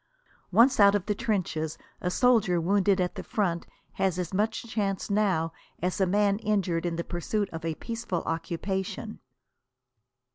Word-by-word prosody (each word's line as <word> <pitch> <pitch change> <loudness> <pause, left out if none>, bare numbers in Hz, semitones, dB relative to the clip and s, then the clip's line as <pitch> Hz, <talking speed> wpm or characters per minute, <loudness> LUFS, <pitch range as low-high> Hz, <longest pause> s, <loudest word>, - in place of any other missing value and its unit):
Once 235 +7 +5
out 200 0 +7
of 200 -2 -1
the 210 - +1
trenches 185 -8 -2 0.2
a 180 - 0
soldier 215 -5 +3
wounded 195 +2 +2
at 180 -1 0
the - - -5
front 175 -6 -1 0.2
has 190 -2 0
as 180 0 -3
much 215 +3 0
chance 205 -3 -2
now 185 -6 +1 0.3
as 180 +3 -1
a 190 - +4
man 200 +1 +2
injured 190 -6 0
in 170 - -2
the 170 - -2
pursuit 200 +5 -2
of 165 0 -6
a 165 -1 -2
peaceful 225 -6 -4
occupation. 190 +6 -3
195 Hz, 155 wpm, -28 LUFS, 175-210 Hz, 0.3 s, out